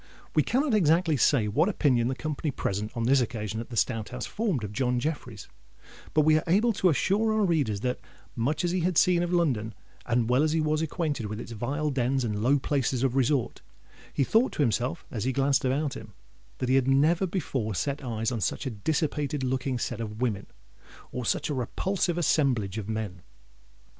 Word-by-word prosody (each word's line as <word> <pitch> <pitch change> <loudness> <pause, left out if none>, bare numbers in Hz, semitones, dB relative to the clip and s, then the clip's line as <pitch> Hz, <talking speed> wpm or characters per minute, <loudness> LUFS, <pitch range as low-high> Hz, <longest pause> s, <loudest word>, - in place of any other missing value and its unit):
We - - +4
cannot 270 +1 +1
exactly 165 -4 +3
say 125 -4 +3
what 155 - +2
opinion 130 - +2
the 130 - -1
company 150 +4 -3
present 105 -5 -3
on 115 - -1
this 130 +3 +4
occasion 110 -2 -3
at 115 - -7
the 120 - -6
Stout 110 0 0
House 125 0 -5
formed 200 - -2
of 105 -1 -5
John 125 +2 0
Jeffreys; 125 -6 -4 0.7
but 155 - +6
we 155 +1 +4
are - - -7
able 210 +7 +3
to 190 -2 +2
assure 205 +8 +2
our 215 -1 +2
readers 140 - 0
that, 125 +1 -1 0.4
much 145 +8 0
as 175 - 0
he 185 - 0
had 175 -1 0
seen 180 -1 +4
of 175 0 -1
London, 130 -11 0 0.3
and 120 -1 +1
well 125 +3 +3
as 155 0 +2
he 165 - +2
was 155 0 +1
acquainted 155 - -2
with 105 +1 -5
its 120 - -8
vile 140 +7 -2
dens 130 0 0
and 105 -3 -2
low 135 +5 +4
places 135 -2 0
of 130 -1 +1
resort, 135 -1 +1 0.5
he 140 - +1
thought 225 - +3
to 150 - +1
himself, 125 +6 -1
as 110 - -3
he 130 - +1
glanced 135 0 +1
about 140 +2 0
him, 105 -2 -10 0.4
that 130 - -2
he 130 - +2
had 135 -1 +3
never 155 +7 +3
before 135 - -2
set 140 +7 -2
eyes 115 -1 -2
on 115 -3 -3
such - - -1
a 130 - -2
dissipated 145 +4 -1
looking 130 0 -1
set 120 -1 -3
of 105 -1 -6
women 110 -6 -1 0.6
or 125 -2 -4
such - - 0
a 150 - -2
repulsive 175 +7 -1
assemblage 125 - +1
of 105 0 -7
men. 105 -5 -4
135 Hz, 205 wpm, -27 LUFS, 115-155 Hz, 0.7 s, but